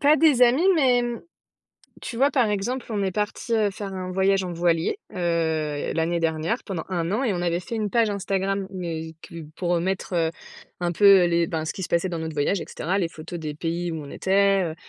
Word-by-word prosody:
Pas 295 +2 +5
des 300 -6 +4
amis, 255 +9 +5
mais 255 -5 +3
mmh, 240 -1 -3 0.8
tu 230 - -6
vois 280 +3 +4
par 245 -6 +2
exemple 235 +6 -2
on 205 -3 -1
est 190 - 0
partis, 210 +4 -2
heu, 215 -2 +3
faire 195 0 -6
un 185 -1 -5
voyage 190 +1 +2
en 175 -1 -4
voilier. 170 - +1 0.2
Heu, 160 -4 -1
l'année 165 +1 0
dernière 160 +7 0
pendant 180 -6 -4
1 170 -2 -1
an 230 +7 0
et 225 - +1
on 175 - -2
avait 175 0 0
fait 230 - -6
une 215 -2 -1
page 230 0 +2
Instagram. 195 0 -1
Mais 160 -3 -5
plus 165 -2 -9
pour, 175 -1 0
heu, 170 - 0
mettre, 190 0 -2
heu, 165 -2 +2 0.5
un 175 -1 0
peu 195 -1 +7
les 170 -1 +2
ben 160 -1 -3
ce - - -3
qui 190 - -6
se 170 - -5
passait 170 +2 +1
dans 170 - -3
notre 160 0 -4
voyage 165 +6 +1
et - - -5
cetera. 185 +5 -2
Les 175 -4 0
photos 165 +2 -8
des 155 -2 -4
pays 170 +2 -2
où 160 - -4
on 140 - -9
était, 195 0 +2
heu, - - -9
185 Hz, 235 wpm, -24 LUFS, 165-210 Hz, 0.8 s, peu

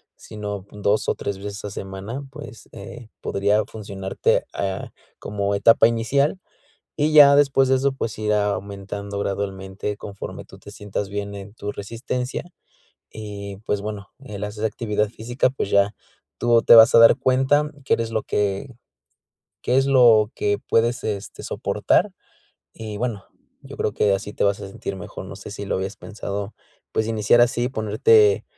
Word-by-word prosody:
sino 105 -2 -7
pon 105 0 -13
2, 105 +1 +2
o, - - +1
3 100 -1 -4
veces 100 +1 -7
a 105 - -5
semana, 100 +8 -6
pues, 145 -7 -11
eh, 110 +3 -10
podría 100 +2 +1
funcionarte, 100 -3 -2
ah, 95 -1 -3 0.3
como 100 0 -2
etapa 115 +3 +5
inicial. 140 +9 0 0.6
Y 155 +1 +1
ya 140 -2 +8
después 135 -2 +4
de 130 - +4
eso, 135 +1 +1
pues, 115 -5 -4
irá 105 -1 +1
aumentando 100 0 -6
gradualmente 100 0 -3
conforme 100 -1 -8
tú - - -15
te - - -12
sientas 105 -1 -5
bien 100 0 -4
en 100 +1 -9
tu 105 -2 -5
resistencia. 125 +4 -4 0.7
Y, 100 -2 -7
pues, 105 - 0
bueno, 105 -2 -6
el 105 -7 -8
hacer 105 +1 -5
esa - - +4
actividad 105 -1 -1
física, 120 +3 -1
pues, 130 -6 -3
ya 100 +1 +3 0.4
tú 120 -1 +3
te - - +8
vas 115 +1 +8
a - - +9
dar 115 - +8
cuenta 135 +3 +2 0.2
que - - +2
eres 115 0 -1
lo 110 - -1
que 105 +5 -2 0.9
qué 125 - +1
es 135 - +4
lo 115 -5 +5
que 100 0 0
puedes, 120 +2 +2
este, 100 -2 -5
soportar. - - 0 0.6
Y 110 -2 -7
bueno, 115 -4 -3 0.4
yo - - -11
creo - - -1
que 100 - +2
así 105 +1 -4
te - - -1
vas 100 -1 +1
a 100 - -6
sentir 95 0 -6
mejor, 95 - -8
no 90 +1 -9
sé 100 - -10
si 100 0 -6
lo - - -1
habías 95 +1 -3
pensado, 100 -1 -6 0.4
pues, 110 0 0
iniciar 110 +1 +3
así, 120 0 +2
ponerte, 110 -2 +3
105 Hz, 170 wpm, -22 LUFS, 100-120 Hz, 0.9 s, a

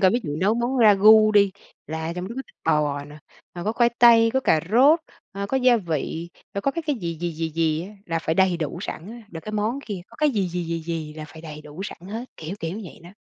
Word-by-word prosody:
coi 185 -2 +5
ví 240 - +1
dụ 145 -2 -4
nấu 195 +7 +2
món 240 +3 -1
ra 215 -4 +7
gu 215 +2 +7
đi, 200 -1 +5 0.4
là 160 +1 -4
trong 180 +2 -5
đó 235 - -7
có 265 - -3
thịt - - -23
bò 150 -2 +1
nè, 145 +1 -12 0.4
rồi 175 -1 -6
có 215 - 0
khoai 235 0 +3
tây, 230 -1 +7
có 265 - +3
cà 160 -10 +3
rốt, 280 +9 +6 0.3
ờ, 200 0 -4
có 265 - -1
gia 250 -2 +5
vị, 165 -2 -3 0.3
rồi 200 - -2
có 275 - +2
cái 335 +4 -4
cái 295 -4 +1
gì, 170 -5 -4
gì, 175 -1 -1
gì, 165 +1 -3
gì 160 0 0
á, 185 - -8 0.2
là 165 -1 -1
phải 160 0 -1
đầy 190 0 +3
đủ 165 0 -4
sẵn 175 +6 -6
á. 235 0 -10
Rồi 165 - -6
cái 215 - -7
món 215 +5 -1
kia, 200 -5 -4
có 235 - -18
cái 300 +2 +3
gì, 200 -7 0
gì, 175 0 -3
gì, 165 0 -3
gì 160 -2 -4
là 155 - -7
phải 160 +2 -12
đầy 155 -2 -8
đủ 150 +5 -9
sẵn 200 - -7
hết, 225 +4 -4
kiểu, 165 +4 -6
kiểu, 170 +6 -4
vậy 170 - -12
đó, 175 - -11
185 Hz, 275 wpm, -24 LUFS, 160-225 Hz, 0.4 s, ra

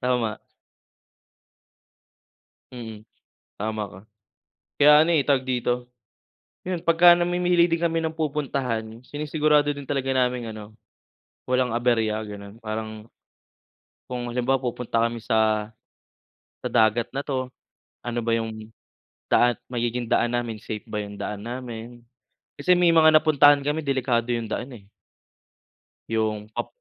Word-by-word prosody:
Tama. 120 -3 -1 2.3
Mm, 110 -4 -9 0.6
tama 110 0 -2
ka. 95 -1 -12 0.8
Kaya 150 +1 +7
ano 165 - +2
eh 140 - +1
tawag 140 -3 +3
dito 125 0 -1 0.8
'yon, 180 -2 -3
pagka-namimili 175 +1 +5
din 165 0 0
kami 165 -1 +1
ng 160 0 -2
pupuntahan, 130 -7 -2
sinisigurado 150 0 +1
din 140 -1 -9
talaga 135 -2 -1
naming 125 -2 0
ano, 105 0 -10 0.8
walang 125 -1 +2
aberya 115 -3 +1
ganon, 100 0 -10
parang 110 0 -6 1.0
Kung 120 -1 -4
halimbawa, 125 +2 +1
pupunta 120 -2 -1
kami 115 -1 -5
sa 110 -2 +1 0.9
sa - - -2
dagat 110 +1 +2
na 140 - -1
'to? 130 -2 -3 0.5
Ano 120 0 -2
ba 115 - -1
yung 110 -1 -5 0.6
daan 120 -1 +4
magiging 120 -1 -2
daan 120 +1 +2
namin, 120 -2 -2
safe 105 -1 -6
ba 105 -1 -3
yung 100 0 -9
daan 105 -1 -5
namin? 120 0 -7 0.6
Kasi 180 - +4
may 175 -1 +4
mga 160 -1 +6
napuntahan 145 -2 +5
kami, 150 +2 -2
delikado 125 -3 0
yung 115 -2 -4
daan 130 +3 -4
eh. 100 -3 -15 1.2
Yung 110 -1 -1
pa - - -3
120 Hz, 125 wpm, -24 LUFS, 110-145 Hz, 2.3 s, Kaya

